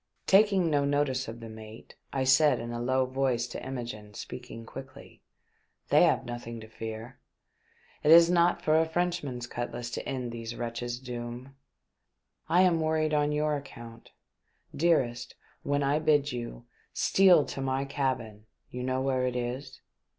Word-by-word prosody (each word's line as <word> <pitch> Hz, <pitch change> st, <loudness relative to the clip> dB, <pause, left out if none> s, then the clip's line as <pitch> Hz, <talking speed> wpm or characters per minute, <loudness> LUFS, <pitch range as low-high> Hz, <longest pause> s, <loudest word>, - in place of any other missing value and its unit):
Taking 195 Hz, -3 st, +4 dB
no 145 Hz, -1 st, +2 dB
notice 140 Hz, -2 st, 0 dB
of 115 Hz, +1 st, -8 dB
the 115 Hz, -, -7 dB
mate, 110 Hz, 0 st, -11 dB, 0.2 s
I 135 Hz, -, -1 dB
said 130 Hz, 0 st, +4 dB
in 120 Hz, 0 st, -5 dB
a 120 Hz, 0 st, -4 dB
low 130 Hz, +1 st, +1 dB
voice 130 Hz, -2 st, 0 dB
to 125 Hz, -, -7 dB
Imogene, 115 Hz, -5 st, -6 dB
speaking 125 Hz, -1 st, -8 dB
quickly, 135 Hz, +2 st, -11 dB, 0.3 s
" -, -, -43 dB
They -, -, +6 dB
have -, -, +1 dB
nothing 120 Hz, -1 st, -6 dB
to 110 Hz, -, -10 dB
fear. 110 Hz, +2 st, -8 dB, 0.8 s
It 150 Hz, -, +1 dB
is 165 Hz, 0 st, +9 dB
not 175 Hz, 0 st, +2 dB
for 155 Hz, +1 st, +4 dB
a 160 Hz, -, +2 dB
Frenchman's 160 Hz, -8 st, -2 dB
cutlass 120 Hz, 0 st, -5 dB
to -, -, -5 dB
end 125 Hz, -3 st, -3 dB
these 115 Hz, 0 st, -6 dB
wretches' 120 Hz, +1 st, -4 dB
doom. 125 Hz, +1 st, -7 dB, 0.9 s
I 180 Hz, +2 st, +5 dB
am 175 Hz, -3 st, +3 dB
worried 155 Hz, -1 st, +1 dB
on 150 Hz, 0 st, +2 dB
your 150 Hz, 0 st, +1 dB
account. 120 Hz, -5 st, -10 dB, 0.7 s
Dearest, 135 Hz, -7 st, +1 dB, 0.3 s
when 145 Hz, 0 st, 0 dB
I 140 Hz, +2 st, +2 dB
bid 145 Hz, -2 st, +2 dB
you, 120 Hz, -, -6 dB, 0.3 s
steal 185 Hz, -6 st, +5 dB
to 135 Hz, -, -6 dB
my 135 Hz, +1 st, -1 dB
cabin 125 Hz, -6 st, -3 dB
— -, -, -48 dB
you 125 Hz, -, -5 dB
know 130 Hz, +1 st, -1 dB
where 130 Hz, -1 st, +1 dB
it 125 Hz, -, -3 dB
is 125 Hz, +3 st, -4 dB
130 Hz, 165 wpm, -29 LUFS, 120-150 Hz, 0.9 s, is